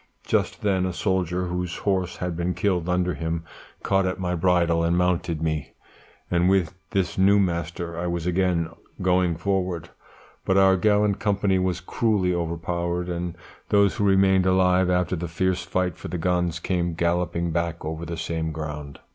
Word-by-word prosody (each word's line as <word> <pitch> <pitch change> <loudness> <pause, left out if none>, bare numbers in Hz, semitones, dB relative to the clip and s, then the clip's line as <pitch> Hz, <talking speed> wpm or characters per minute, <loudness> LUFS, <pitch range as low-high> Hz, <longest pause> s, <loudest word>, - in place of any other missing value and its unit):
Just - - 0
then 95 -3 +2
a 90 - -3
soldier 90 -1 0
whose 90 0 -3
horse 95 -3 -1
had 90 -2 -3
been 85 +2 -1
killed 90 -4 0
under 90 0 +1
him 80 0 -3 0.4
caught 95 -1 +2
at 90 - -3
my 90 -1 -1
bridle 85 -1 +2
and 85 +1 +2
mounted 85 -3 0
me, 80 -3 -2 0.6
and 90 +1 +3
with 95 -3 +2 0.2
this 95 -4 -1
new 100 +2 +5
master 85 -2 -2
I 90 - -2
was 85 -1 -2
again 90 -2 +1 0.3
going 90 -2 +2
forward; 90 -3 -2 0.5
but 95 - +2
our 95 -1 +6
gallant 105 +1 +2
company 100 -2 +1
was 90 -1 -1
cruelly 95 -2 +1
overpowered, 85 +1 -2
and 85 0 -4 0.3
those 100 +1 +3
who 105 - 0
remained 95 -1 +4
alive 95 0 +3
after 90 0 +1
the 85 +1 -4
fierce 95 +2 0
fight 90 -1 -1
for - - -7
the 90 - -3
guns 90 -1 0
came 85 -1 -1
galloping 85 0 0
back 85 0 -2
over 80 +1 -4
the 85 -1 -5
same 80 -1 -2
ground. 75 -2 -6
90 Hz, 170 wpm, -24 LUFS, 85-95 Hz, 0.6 s, our